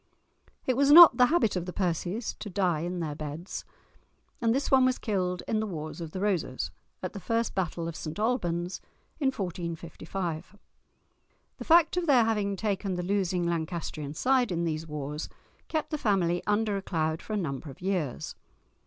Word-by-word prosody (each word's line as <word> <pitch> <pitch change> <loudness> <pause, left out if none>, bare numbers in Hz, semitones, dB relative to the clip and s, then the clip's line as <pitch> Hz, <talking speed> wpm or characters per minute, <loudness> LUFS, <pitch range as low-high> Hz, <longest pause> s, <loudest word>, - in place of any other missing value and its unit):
It 255 - +2
was 280 +2 +3
not 340 +2 +11
the 250 -1 +6
habit 300 - +2
of 180 -1 -2
the - - -3
Percies 185 +4 -1
to 210 - -6
die 180 -4 +1
in 175 +2 -3
their 155 -2 -2
beds, 155 +4 -6 0.8
and 230 -1 +3
this 270 +4 0
one 265 -1 +6
was 255 0 +3
killed 180 -5 -1
in 220 - +1
the 220 - -1
Wars 155 -2 -6
of 165 - -5
the 185 - -6
Roses, 165 - -1 0.3
at 185 - -3
the 200 - -6
first 230 +3 -1
battle 170 -3 -2
of 165 - -5
St 155 +2 -6
Albans, 180 -6 -1 0.4
in 280 - +1
1455. 170 -3 -4 1.0
The - - -6
fact 340 +1 +5
of 350 -1 0
their 260 -5 +6
having 210 -3 0
taken 195 -1 -1
the 180 - -3
losing 185 -2 0
Lancastrian 160 -3 -3
side 255 +2 +2
in 170 -1 0
these 160 -1 -2
wars 150 0 -5 0.4
kept 315 -2 -2
the 305 - -2
family 175 -6 +1
under 210 0 +1
a - - -3
cloud 160 -3 -1
for 215 - -6
a - - +1
number 145 -5 -3
of 135 - -11
years. 180 -8 -2
185 Hz, 180 wpm, -28 LUFS, 165-220 Hz, 1.0 s, not